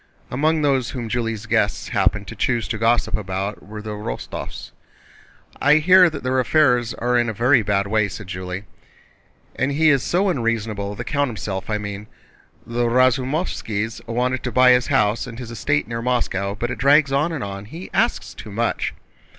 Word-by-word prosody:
Among 155 Hz, +4 st, +1 dB
those 135 Hz, -4 st, +2 dB
whom 120 Hz, -4 st, -5 dB
Julie's 115 Hz, -2 st, -2 dB
guests 110 Hz, -2 st, 0 dB
happened -, -, +1 dB
to -, -, -8 dB
choose 120 Hz, -3 st, 0 dB
to 110 Hz, -, -3 dB
gossip 115 Hz, +2 st, +2 dB
about 100 Hz, 0 st, -4 dB
were 105 Hz, +1 st, -9 dB
the 110 Hz, -, -5 dB
Rostóvs. 105 Hz, -13 st, -6 dB, 0.9 s
"I 145 Hz, +1 st, +5 dB
hear 180 Hz, +3 st, +6 dB
that 150 Hz, -3 st, -7 dB
their 130 Hz, +1 st, +1 dB
affairs 125 Hz, -4 st, +2 dB
are 125 Hz, +1 st, 0 dB
in 120 Hz, -1 st, +1 dB
a -, -, -3 dB
very 125 Hz, +4 st, +4 dB
bad 100 Hz, -1 st, 0 dB
way," 105 Hz, 0 st, +1 dB
said 100 Hz, +2 st, -8 dB
Julie. 90 Hz, +1 st, -5 dB, 0.9 s
"And 135 Hz, -, 0 dB
he 155 Hz, +2 st, +3 dB
is 140 Hz, -2 st, +3 dB
so 185 Hz, +8 st, +1 dB
unreasonable, 110 Hz, -, -2 dB
the -, -, -5 dB
count 145 Hz, -2 st, 0 dB
himself 100 Hz, -4 st, -5 dB
I 105 Hz, -, 0 dB
mean. 100 Hz, 0 st, -6 dB, 0.6 s
The 120 Hz, +1 st, -1 dB
Razumóvskis 125 Hz, -, 0 dB
wanted 125 Hz, +2 st, -1 dB
to 125 Hz, -, -3 dB
buy 125 Hz, +1 st, +6 dB
his 125 Hz, -1 st, +3 dB
house 105 Hz, +3 st, +1 dB
and 115 Hz, -2 st, -8 dB
his 120 Hz, -2 st, -7 dB
estate 145 Hz, +3 st, 0 dB
near 115 Hz, 0 st, -4 dB
Moscow, 100 Hz, -5 st, -1 dB
but 120 Hz, +4 st, -3 dB
it -, -, -5 dB
drags 140 Hz, +1 st, +4 dB
on 145 Hz, +5 st, +1 dB
and 155 Hz, -5 st, -3 dB
on. 100 Hz, 0 st, -6 dB
He 165 Hz, -, -9 dB
asks 225 Hz, +6 st, 0 dB
too 110 Hz, -, -10 dB
much." 115 Hz, +3 st, -1 dB
120 Hz, 185 wpm, -21 LUFS, 105-135 Hz, 0.9 s, hear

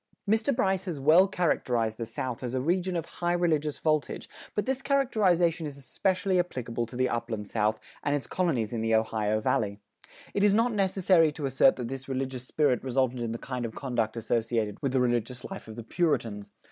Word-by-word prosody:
Mr. 220 Hz, +5 st, +2 dB
Bryce 190 Hz, -5 st, +1 dB
has 170 Hz, -6 st, -4 dB
well 160 Hz, +7 st, +6 dB
characterized 120 Hz, -, 0 dB
the 115 Hz, -, -3 dB
South 120 Hz, +1 st, -4 dB
as 125 Hz, 0 st, -3 dB
a -, -, +1 dB
region 180 Hz, +6 st, 0 dB
of 165 Hz, -2 st, -2 dB
"high 175 Hz, 0 st, -2 dB
religious 155 Hz, -4 st, +1 dB
voltage," 155 Hz, -2 st, -1 dB, 0.3 s
but 210 Hz, -, 0 dB
this 265 Hz, +1 st, -1 dB
characterization 190 Hz, -, +2 dB
is 140 Hz, -1 st, -8 dB
especially 185 Hz, +6 st, 0 dB
applicable 120 Hz, -9 st, -2 dB
to 125 Hz, -, -11 dB
the 130 Hz, +1 st, +2 dB
Upland 115 Hz, -4 st, -3 dB
South, 110 Hz, 0 st, 0 dB, 0.2 s
and 145 Hz, -, +1 dB
its 140 Hz, -5 st, -3 dB
colonies 135 Hz, -, 0 dB
in 115 Hz, -, -2 dB
the 115 Hz, 0 st, +2 dB
Ohio 110 Hz, -1 st, +1 dB
Valley. 105 Hz, -1 st, 0 dB, 0.5 s
It 200 Hz, -, +1 dB
is 205 Hz, -1 st, +5 dB
not 230 Hz, +2 st, +2 dB
necessary 190 Hz, -5 st, +3 dB
to 150 Hz, -2 st, -4 dB
assert 135 Hz, 0 st, +4 dB
that 125 Hz, -2 st, -4 dB
this 135 Hz, 0 st, -6 dB
religious 130 Hz, -1 st, -3 dB
spirit 140 Hz, -6 st, +1 dB
resulted 130 Hz, -1 st, 0 dB
in 115 Hz, -1 st, -2 dB
the 115 Hz, -, -3 dB
kind 125 Hz, 0 st, -5 dB
of 115 Hz, -2 st, -5 dB
conduct 120 Hz, -4 st, -2 dB
associated 115 Hz, -2 st, -1 dB
with 135 Hz, -, 0 dB
the 130 Hz, -, +3 dB
religious 120 Hz, 0 st, 0 dB
life 195 Hz, -9 st, -8 dB
of 110 Hz, -, -8 dB
the 115 Hz, -, -7 dB
Puritans. 110 Hz, -, -1 dB
135 Hz, 195 wpm, -28 LUFS, 115-175 Hz, 0.5 s, well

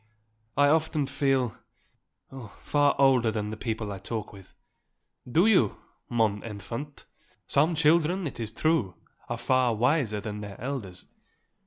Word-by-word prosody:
"I 145 Hz, -, +5 dB
often 155 Hz, -1 st, +2 dB
feel, 135 Hz, -4 st, 0 dB, 0.8 s
oh 130 Hz, -5 st, -10 dB
far 145 Hz, -1 st, +2 dB
older 130 Hz, -4 st, +4 dB
than 105 Hz, -1 st, -3 dB
the -, -, -4 dB
people 110 Hz, -2 st, -4 dB
I 100 Hz, -, -6 dB
talk 110 Hz, +2 st, -5 dB
with." 95 Hz, -2 st, -15 dB, 0.8 s
"Do 170 Hz, +9 st, +4 dB
you, 185 Hz, -, +3 dB, 0.3 s
mon 110 Hz, -3 st, +1 dB
enfant. 115 Hz, +7 st, -7 dB, 0.4 s
Some 155 Hz, +4 st, +2 dB
children, 165 Hz, +4 st, +3 dB
it 140 Hz, -, -5 dB
is 110 Hz, -2 st, -4 dB
true, 135 Hz, -, 0 dB, 0.3 s
are 120 Hz, -, -2 dB
far 125 Hz, 0 st, +2 dB
wiser 120 Hz, -2 st, +1 dB
than 105 Hz, 0 st, -6 dB
their 100 Hz, -1 st, -8 dB
elders. 115 Hz, -8 st, -5 dB
120 Hz, 140 wpm, -27 LUFS, 110-145 Hz, 0.8 s, I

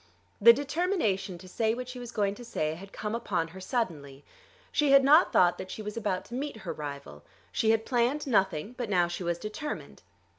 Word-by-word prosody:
The 235 Hz, +3 st, +10 dB
determination 270 Hz, -, -1 dB
to 185 Hz, -, -13 dB
say 220 Hz, +4 st, 0 dB
what 250 Hz, 0 st, -6 dB
she 250 Hz, 0 st, -7 dB
was 245 Hz, -1 st, -7 dB
going 200 Hz, -4 st, 0 dB
to 245 Hz, -, -11 dB
say 155 Hz, -10 st, -2 dB
had 195 Hz, +4 st, -10 dB
come 210 Hz, 0 st, -4 dB
upon 185 Hz, -8 st, -1 dB
her 190 Hz, +3 st, -11 dB
suddenly. 155 Hz, -, -3 dB, 0.5 s
She 295 Hz, -1 st, +2 dB
had 275 Hz, 0 st, +7 dB
not 300 Hz, +6 st, +6 dB
thought 175 Hz, -1 st, +4 dB
that 185 Hz, -, -6 dB
she 215 Hz, -, -6 dB
was 210 Hz, 0 st, -5 dB
about 205 Hz, -5 st, -2 dB
to -, -, -12 dB
meet 275 Hz, -1 st, -4 dB
her 165 Hz, -, -3 dB
rival. 140 Hz, -, -8 dB, 0.3 s
She 220 Hz, -, +1 dB
had 225 Hz, 0 st, +3 dB
planned 250 Hz, +4 st, +1 dB
nothing; 195 Hz, -, +1 dB
but 240 Hz, -3 st, -3 dB
now 180 Hz, -3 st, +3 dB
she 175 Hz, +2 st, -5 dB
was 170 Hz, 0 st, -1 dB
determined. 215 Hz, -, -6 dB
210 Hz, 210 wpm, -29 LUFS, 175-245 Hz, 0.5 s, The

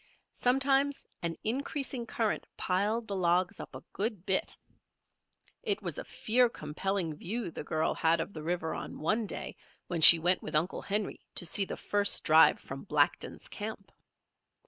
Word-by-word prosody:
Sometimes 270 Hz, +2 st, +1 dB, 0.2 s
an 165 Hz, -2 st, -3 dB
increasing 260 Hz, 0 st, -2 dB
current 225 Hz, -2 st, -2 dB
piled 210 Hz, +5 st, -1 dB
the 200 Hz, -, -4 dB
logs 180 Hz, 0 st, +1 dB
up -, -, -9 dB
a -, -, -9 dB
good 205 Hz, -3 st, -2 dB
bit. 190 Hz, -2 st, +1 dB, 1.1 s
It 425 Hz, -4 st, -2 dB
was -, -, -3 dB
a -, -, -5 dB
fear 245 Hz, +2 st, +2 dB
compelling 165 Hz, 0 st, -3 dB
view 200 Hz, +3 st, -3 dB
the -, -, -7 dB
girl 155 Hz, +1 st, -1 dB
had 165 Hz, +1 st, +1 dB
of 200 Hz, -, -4 dB
the 155 Hz, -, -7 dB
river 165 Hz, 0 st, -2 dB
on -, -, -7 dB
one 215 Hz, +8 st, -1 dB
day -, -, -6 dB, 0.3 s
when 170 Hz, -2 st, -2 dB
she 170 Hz, -, +12 dB
went 175 Hz, +3 st, +2 dB
with -, -, -6 dB
Uncle 160 Hz, +5 st, 0 dB
Henry 205 Hz, +1 st, -3 dB, 0.2 s
to -, -, +1 dB
see 195 Hz, +4 st, +4 dB
the -, -, -6 dB
first 205 Hz, 0 st, +1 dB
drive 160 Hz, 0 st, +5 dB
from 135 Hz, +1 st, -9 dB
Blackton's 150 Hz, -3 st, 0 dB
camp. 210 Hz, -2 st, -7 dB
195 Hz, 165 wpm, -30 LUFS, 165-225 Hz, 1.1 s, she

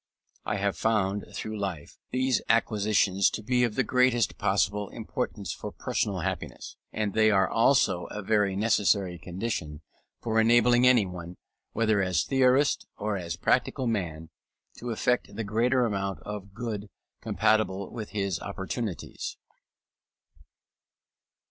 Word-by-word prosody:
I -, -, -1 dB
have 100 Hz, 0 st, 0 dB
found, 105 Hz, -3 st, 0 dB
through 110 Hz, -1 st, -5 dB
life, 95 Hz, -7 st, -5 dB
these 130 Hz, -2 st, +1 dB
acquisitions 105 Hz, -4 st, +3 dB
to 110 Hz, -, -6 dB
be 125 Hz, +3 st, +2 dB
of 115 Hz, -3 st, 0 dB
the 130 Hz, -, +2 dB
greatest 125 Hz, -2 st, +2 dB
possible 105 Hz, 0 st, +1 dB
importance -, -, -4 dB
for -, -, -7 dB
personal -, -, -2 dB
happiness, -, -, -5 dB, 0.2 s
and 105 Hz, -2 st, -2 dB
they 110 Hz, 0 st, +4 dB
are 95 Hz, -2 st, +4 dB
also 115 Hz, -6 st, +3 dB
a 105 Hz, -, -6 dB
very 105 Hz, -2 st, +2 dB
necessary 100 Hz, -4 st, +2 dB
condition 90 Hz, -6 st, -4 dB, 0.4 s
for 110 Hz, -1 st, 0 dB
enabling 120 Hz, +2 st, +5 dB
anyone, 90 Hz, -8 st, +1 dB, 0.4 s
either 110 Hz, -3 st, +3 dB
as 90 Hz, -4 st, +1 dB
theorist 135 Hz, +1 st, +2 dB
or 105 Hz, 0 st, -2 dB
as 85 Hz, -4 st, -4 dB
practical 130 Hz, -, +1 dB
man, 85 Hz, -8 st, -2 dB, 0.5 s
to 120 Hz, -, -5 dB
effect 120 Hz, 0 st, 0 dB
the 115 Hz, -, -3 dB
greatest 120 Hz, +4 st, +2 dB
amount 100 Hz, -3 st, -2 dB
of 105 Hz, -2 st, -7 dB
good 110 Hz, -3 st, -4 dB, 0.3 s
compatible 100 Hz, -3 st, +1 dB
with 110 Hz, -3 st, -6 dB
his 100 Hz, -4 st, -2 dB
opportunities. 100 Hz, 0 st, -5 dB
105 Hz, 130 wpm, -28 LUFS, 95-115 Hz, 0.5 s, enabling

